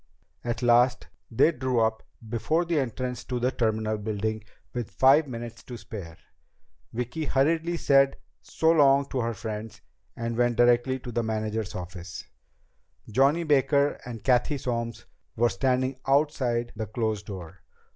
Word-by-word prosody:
At 120 0 -3
last 120 +1 +3 0.2
they 130 +8 +4
drew 130 -4 -1
up 110 0 +1 0.3
before 155 +10 0
the 165 -2 +1
entrance 125 -1 -3
to 125 -1 -2
the 125 +2 +1
terminal 110 -2 0
building 110 +1 -2 0.3
with 120 -3 -3
five 140 +4 +5
minutes 115 -2 -7
to 125 - -7
spare. 100 -6 -9 0.7
Vicki 125 +7 -3
hurriedly 165 +5 +1
said 135 -3 +4 0.2
so 160 0 +1
long 140 -3 +5
to 130 - -2
her 115 -1 -1
friends, 110 0 -6 0.3
and 115 0 -3
went 120 0 +2
directly 120 +2 +4
to 125 -1 -8
the 120 - 0
manager's 110 -1 -3
office. 90 0 -7 0.9
Johnny 140 +8 +3
Baker 140 -1 +2
and 115 -4 -8
Cathy 130 +4 +2
Solms 115 -3 -3 0.3
were 120 +1 +3
standing 130 0 0
outside 135 -4 +1
the 110 0 -4
closed 110 -2 -2
door. 90 -3 -8
120 Hz, 145 wpm, -27 LUFS, 110-135 Hz, 0.9 s, five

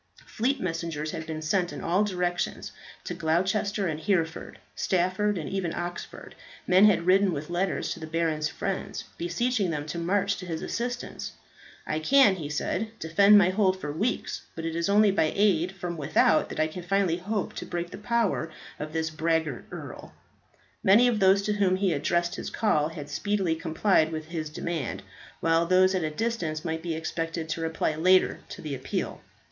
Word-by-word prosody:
Fleet 260 +5 -1
messengers 165 -4 -3
had 160 - -6
been 155 -1 -5
sent 175 +3 +1
in - - -7
all 180 +5 +2
directions. 180 -3 -2 0.3
To - - -4
Gloucester 190 +5 0
and 155 -3 -2
Hereford, 165 -3 -1 0.2
Stafford, 185 +3 +1
and 160 - -4
even 190 -4 -2
Oxford, 175 0 -6 0.3
men 185 +3 +6
had 200 -5 +4
ridden, 190 +1 +4
with 150 +2 -5
letters 185 +2 -1
to - - -10
the 160 - -7
baron's 160 -2 0
friends, 195 -1 -4 0.2
beseeching 200 +4 0
them 150 -3 -3
to 155 +3 -4
march 200 +3 +1
to 180 0 -8
his 165 -2 -4
assistance. 245 +1 -4 0.5
"I 155 - -1
can," 210 - +5
he 150 -4 -5
said, 215 +9 -2
"defend 200 +5 +5
my 185 -2 +5
hold 190 -1 +2
for 150 -4 -4
weeks. 215 +11 -2
But 165 - -5
it 165 0 -3
is 170 +2 0
only 205 0 +5
by 160 -5 +2
aid 190 -3 +2
from 175 -2 -5
without 155 +1 +3
that - - -6
I 155 - +4
can 160 +3 -6
finally 180 -1 +1
hope 200 +2 -3
to - - -6
break 175 0 -4
the - - -8
power 230 -6 0 0.3
of 155 +1 -5
this 160 0 -1
braggart 160 -4 -1
earl." - - -9 0.7
Many 215 +6 +6
of 235 -3 +1
those 195 0 +5
to 210 +1 0
whom 195 -3 +2
he 190 -2 +1
addressed 175 +4 0
his - - -5
call 155 -9 +1
had 150 -3 -8
speedily 190 +3 0
complied 160 0 +2
with 155 0 -5
his 160 -3 -4
demand, 160 -2 -4 0.4
while 165 0 +2
those 185 +1 +4
at 185 -3 0
a 155 - 0
distance 165 -4 -2
might 160 -1 -2
be 165 -1 -3
expected 165 0 -3
to 165 - -2
reply 160 -1 -1
later 185 +4 +3
to - - -9
the 150 -2 -4
appeal. 130 -1 -4
175 Hz, 185 wpm, -27 LUFS, 160-195 Hz, 0.7 s, men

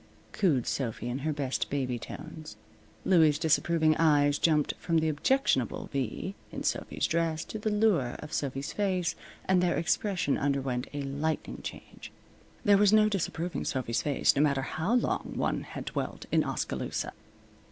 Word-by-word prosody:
cooed 150 - +2
Sophy 120 -3 -2
in 125 +2 -2
her 155 +3 -1
best 140 -3 -2
baby 130 -4 -1
tones. 155 +6 -9 0.5
Louie's 160 -5 +5
disapproving 160 0 +3
eyes 145 -3 +4
jumped 155 -3 +2
from 165 -2 0
the 160 0 +2
objectionable 155 - +1
V 135 - -2 0.2
in - - -5
Sophy's - - -1
dress 165 -1 0
to 220 - -6
the 215 - -1
lure 205 - +2
of 150 - -9
Sophy's 135 0 -2
face, 185 -4 0 0.3
and 190 -1 +3
their 175 -1 +1
expression 175 -3 0
underwent 135 -3 -1
a 145 -1 -4
lightning 145 +3 -3
change. - - -9 0.5
There 200 -2 +6
was 205 -1 +5
no 215 0 +5
disapproving 175 -3 -2
Sophy's 125 -3 -1
face, 145 0 +2
no 140 - +3
matter 140 -3 +2
how 160 - -1
long 245 - 0
one - - 0
had - - -7
dwelt - - -4
in - - +4
Oskaloosa. - - -3
155 Hz, 155 wpm, -29 LUFS, 140-180 Hz, 0.5 s, There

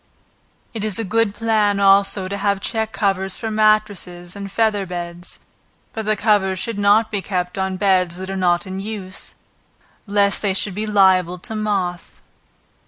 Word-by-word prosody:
It 220 -3 -4
is 215 -3 -1
a 225 - -1
good 220 0 +1
plan 210 -2 +1
also 195 -1 +4
to 200 - -4
have 200 0 0
check 220 +1 -2
covers 195 -2 -1
for 225 - -4
matresses 210 -5 0
and 200 -1 -7
feather 210 -3 +1
beds, 175 0 -5 0.6
but 220 -1 -5
the 215 - +2
covers 205 -3 +2
should 205 +3 -3
not 210 +2 +4
be 205 -2 -1
kept 180 -2 -3
on 190 -1 -2
beds 185 -3 +2
that 190 +1 -6
are - - -3
not 180 0 +1
in 190 0 -5
use, 200 -2 -6 0.7
lest 200 0 +2
they 195 -3 0
should 195 0 0
be 215 +3 -3
liable 190 -3 +3
to 220 +5 -7
moth. 195 -5 -2
200 Hz, 170 wpm, -20 LUFS, 185-215 Hz, 0.7 s, also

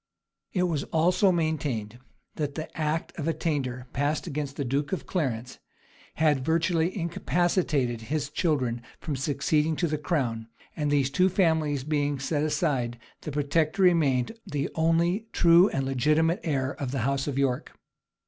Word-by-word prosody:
It 180 - +1
was 165 -6 0
also 180 +5 +3
maintained 140 -10 -2 0.3
that 145 -2 -3
the 155 - -6
act 155 +1 -1
of 155 - -2
attainder 135 -6 -2
passed 145 +3 0
against 145 -4 -4
the 140 - -3
duke 140 +3 -1
of 190 - -3
Clarence, 125 - -3 0.6
had 150 -4 +2
virtually 165 +3 +1
incapacitated 165 - 0
his 145 +5 -3
children 130 -8 0 0.2
from 150 - -3
succeeding 150 +3 +1
to 170 - 0
the 155 -1 -2
crown; 125 -9 -1 0.3
and 150 -2 -1
these 140 -2 +2
two 185 +6 +3
families 160 -7 +1
being 145 -1 0
set 145 +3 -1
aside, 145 -6 0 0.2
the 150 - -5
protector 155 +6 +1
remained 145 -9 +3
the 145 -7 -3
only 170 +6 +1
true 170 +3 +6
and 135 -1 -1
legitimate 150 +6 +2
heir 135 -5 0
of 140 - -4
the 130 -1 -2
house 135 +1 0
of 140 -2 -2
York. 135 -3 -1
150 Hz, 150 wpm, -27 LUFS, 135-165 Hz, 0.6 s, true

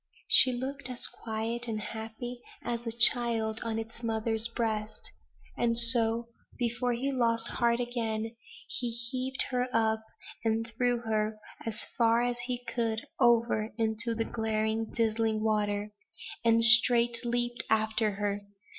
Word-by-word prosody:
She 255 - +8
looked 265 +3 -5
as 250 - +2
quiet 230 +2 -3
and 220 -2 -4
happy 225 +3 -8 0.2
as 235 0 -5
a - - -2
child 230 -2 +2
on 225 -1 -3
its 225 +1 -7
mother's 225 0 -1
breast! 220 -2 -4 0.4
and 230 -1 0
so 235 -1 +7 0.3
before 245 0 -2
he 265 +4 -3
lost 230 -3 0
heart 235 -1 0
again, 225 -2 -4 0.3
he 245 - -3
heaved 255 +3 -2
her 250 0 -1
up, 220 -1 0 0.4
and 225 0 -1
threw 245 0 0
her 215 -1 -2 0.3
as 220 -1 -4 0.2
far 230 0 +3
as 245 0 -2
he 245 -1 -5
could 225 -2 -3
over 230 -2 +2
into 225 +1 -2
the 225 0 -2
glaring, 220 0 -3
dizzying 220 -1 -1
water; 210 -1 -1 0.5
and 230 0 +3
straight 235 0 +8
leaped 240 0 -2
after 220 -1 0
her. 200 0 -4
230 Hz, 135 wpm, -28 LUFS, 220-240 Hz, 0.5 s, She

